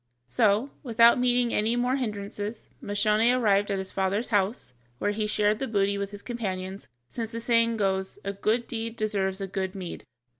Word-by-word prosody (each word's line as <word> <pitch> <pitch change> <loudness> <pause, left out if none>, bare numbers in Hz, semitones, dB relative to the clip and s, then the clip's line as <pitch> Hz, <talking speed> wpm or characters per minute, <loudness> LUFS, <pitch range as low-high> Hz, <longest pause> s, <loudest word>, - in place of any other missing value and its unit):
So, 205 - +2
without 235 -1 +5
meeting 245 -1 +3
any 220 +3 +2
more 250 +2 +1
hindrances, 210 -2 -4 0.2
Moscione 215 +4 +2
arrived 205 -3 +2
at 200 - 0
his 190 0 -4
father's 195 +4 0
house, 200 - 0 0.2
where 205 - 0
he 210 0 -1
shared 210 0 +1
the 270 - -2
booty 200 -2 +1
with 200 0 -3
his 205 0 -10
companions, 195 -5 -5 0.2
since 225 - -5
the 230 - -3
saying 230 -1 +2
goes, 190 -2 -1
"A 200 - -3
good 220 +4 0
deed 230 -1 -4
deserves 200 -3 -1
a 195 - -2
good 190 0 -3
meed." 185 -3 -6
210 Hz, 180 wpm, -27 LUFS, 195-230 Hz, 0.2 s, without